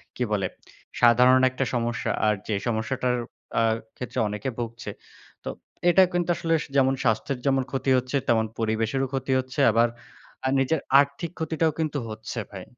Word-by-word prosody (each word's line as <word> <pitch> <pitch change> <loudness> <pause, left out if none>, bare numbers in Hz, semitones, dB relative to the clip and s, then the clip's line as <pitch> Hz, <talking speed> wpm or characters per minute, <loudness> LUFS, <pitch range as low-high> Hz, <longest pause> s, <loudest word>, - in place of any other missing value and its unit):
কি 125 - -1
বলে 95 -3 +1 0.5
সাধারণ 125 +2 +6
একটা 130 +1 -2
সমস্যা। 120 -1 -1
আর 105 - +4
যে 110 - -1
সমস্যাটার 125 +2 0 0.4
আ - - +4 0.3
ক্ষেত্রে 125 0 -5
অনেকে 105 +5 -3
ভুগছে। 115 -1 -5 0.5
তো - - -4 0.4
এটা 190 +2 +6
কিন্তু 175 -1 0
আসলে 165 0 -1 0.2
যেমন 135 -1 +4
স্বাস্থ্যের 115 +3 0
যেমন 135 -1 +2
ক্ষতি 135 0 -1
হচ্ছে, 125 +2 -1
তেমন 110 -1 +3
পরিবেশেরও 115 +4 0
ক্ষতি 135 0 -2
হচ্ছে। 130 +2 -5
আবার 115 +2 +4 0.7
নিজের 150 +4 +1 0.2
আর্থিক 145 +4 0
ক্ষতিটাও 160 0 +1
কিন্তু 155 -2 -1
হচ্ছে 110 +2 -6
ভাই 95 -3 -8
125 Hz, 150 wpm, -25 LUFS, 115-135 Hz, 0.7 s, সাধারণ